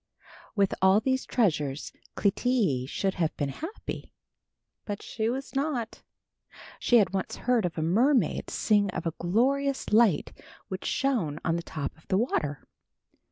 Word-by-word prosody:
With 200 -2 +2
all 190 +2 +6
these 260 +3 -1
treasures 150 - 0 0.2
Clytie 200 - +1
should 195 +3 -1
have 160 - 0
been 145 -2 -1
happy, 325 - -7 0.7
but 205 -1 -5
she 220 -1 -2
was 270 +3 -4
not. 270 -5 -2 0.8
She 240 - +4
had 205 -4 +4
once 190 -1 -2
heard 230 -8 +1
a - - 0
mermaid 225 - +2
sing 205 -2 +2
of - - -3
a 165 - -1
glorious 265 +10 +1
light 215 -7 +4 0.4
which 190 0 -5
shone 210 - 0
on 165 - +2
the 170 - -1
top 155 -4 -5
of - - -26
the 190 - +2
water. 150 - -1
205 Hz, 145 wpm, -28 LUFS, 165-250 Hz, 0.8 s, all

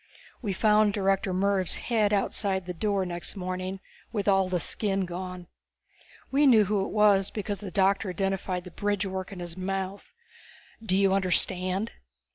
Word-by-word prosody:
We 210 -5 -2
found 210 +1 +3
Director 195 -1 +1
Mervv's 190 -1 +1
head 220 -4 +1
outside 195 -2 0
the 180 - -4
door 195 +2 0
next 175 +2 -5
morning 185 0 -4 0.3
with 210 -3 -2
all 195 -2 +3
the 180 -1 0
skin 195 +3 0
gone. 180 0 -6 0.9
We 285 +2 +4
knew 225 -5 +7
who 200 0 +1
it - - -4
was 205 -2 +4
because 205 -2 -4
the 205 -1 -6
doctor 195 +2 +2
identified 185 0 -2
the 180 - -10
bridgework 195 -1 -2
in 195 - -8
his 175 -1 -6
mouth. 190 +1 -4 0.7
_Do 190 -4 +1
you 195 -1 +4
understand? 185 +2 0
195 Hz, 155 wpm, -27 LUFS, 185-205 Hz, 0.9 s, knew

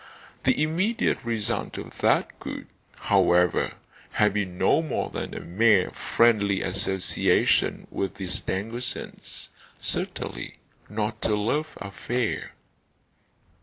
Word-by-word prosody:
The 150 - +3
immediate 180 - +1
result 115 -3 -2
of - - -8
that - - +2
could, - - -6 0.3
however, 90 -3 +3 0.4
have 105 -1 +3
been 95 -4 -2
no 95 - +4
more 160 - -2
than - - -4
a - - -5
mere 100 0 +3
friendly 105 -4 +3
association 95 0 +2
with 95 - -2
the 95 - -5
Stangersons; 110 +6 -3 0.3
certainly, - - -3 0.3
not 110 +1 -2
a 105 - +2
love 145 +10 -1
affair. 115 +4 -3
105 Hz, 105 wpm, -26 LUFS, 95-120 Hz, 0.4 s, no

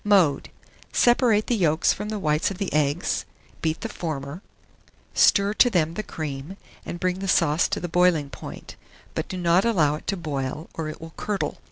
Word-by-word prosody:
Mode. 185 -9 +3 0.4
Separate 240 -3 +4
the 240 - +1
yolks 165 -6 +3
from 210 +1 -5
the 215 - -2
whites 150 -5 +1
of 195 - -6
the 200 -1 -3
eggs; 150 +2 +1 0.4
beat 160 0 -1
the - - -2
former, 150 0 -5 0.7
stir 200 +1 +4
to 245 - +5
them 165 -7 +1
the 215 - -3
cream, 155 -1 -6 0.3
and 170 +1 -6
bring 185 +1 0
the 195 - -4
sauce 155 -3 +3
to - - -2
the 175 - -4
boiling 170 -4 +2
point, - - -9 0.4
but - - -3
do 185 - -5
not 175 +1 +3
allow 170 -11 +3
it 150 - -7
to 195 - 0
boil, 150 -1 -4
or 160 -1 -4
it 155 - -8
will 165 0 -10
curdle. 205 -2 -2
170 Hz, 190 wpm, -24 LUFS, 155-195 Hz, 0.7 s, to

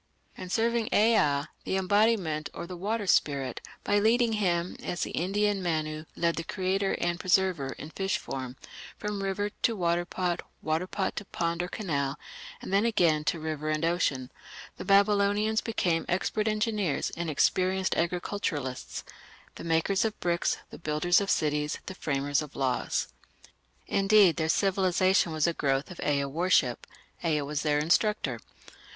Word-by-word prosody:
In 185 - -8
serving 230 +2 +1
Ea, 180 -11 +3 0.2
the 190 - -1
embodiment 190 -5 +2
or 170 - -5
the 180 +1 -7
water 205 +4 -2
spirit, 140 -8 +1 0.2
by 205 +1 +2
leading 230 +2 +3
him, 180 -4 0
as 175 - -3
the - - -4
Indian 200 +3 0
Manu 155 -3 -2
led 170 -1 0
the 165 - -2
Creator 190 +3 -1
and 175 0 -1
"Preserver" 180 -7 +1
in 150 - -9
fish 195 +2 -1
form, 130 -1 -6 0.4
from 210 -1 -3
river 200 +1 -1
to 230 - +2
water 175 -2 +1
pot, 175 0 -2 0.2
water 160 +4 0
pot 190 0 -2
to 210 - -4
pond 170 -2 -2
or 180 - -2
canal, 145 -8 -2 0.5
and - - -5
then 200 +2 +4
again 170 -9 +2
to 170 - 0
river 155 -1 -3
and 155 +1 0
ocean, 140 -7 0 0.5
the - - -6
Babylonians 205 +2 +3
became 175 -7 0
expert 210 +4 0
engineers 215 - 0
and 170 -1 -4
experienced 185 +5 +1
agriculturists, 170 -6 -2 0.5
the - - -9
makers 165 +4 +1
of 220 -1 -2
bricks, 170 -1 0
the - - -10
builders 165 +4 +2
of 200 - -3
cities, 150 -1 0
the - - -6
framers 145 -4 0
of 150 -1 -9
laws. 130 -3 -1 0.8
Indeed, 195 -3 +4
their 160 -1 0
civilization 185 -1 +2
was 155 -2 +1
a 170 - +2
growth 135 +1 0
of 180 - -10
Ea 140 -1 +1
worship. 145 -4 +1 0.4
Ea 155 -3 +1
was 145 +1 -3
their 150 -1 +1
instructor. 155 - +1
175 Hz, 155 wpm, -28 LUFS, 155-200 Hz, 0.8 s, then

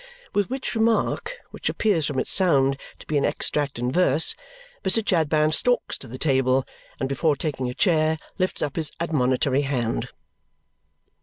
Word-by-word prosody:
With 205 +1 +1
which 265 0 -3
remark, 225 - +1 0.2
which - - -3
appears 175 -9 +1
from 145 - -3
its 130 - -1
sound 140 -7 +3 0.2
to - - -14
be 150 -2 +1
an - - -1
extract 145 -3 -1
in 125 +1 -1
verse, 160 -1 +3 0.5
Mr. 205 +3 +1
Chadband 155 -3 +2
stalks 245 +8 +2
to - - -10
the 125 +3 -8
table, 130 -2 +2 0.3
and 130 - -1
before 145 +3 +1
taking 135 -4 -3
a 125 - -6
chair, 160 -4 +2 0.2
lifts 185 0 0
up 145 - -3
his 160 -2 0
admonitory 135 -4 +1
hand. 125 -5 -1
150 Hz, 160 wpm, -24 LUFS, 135-180 Hz, 0.5 s, sound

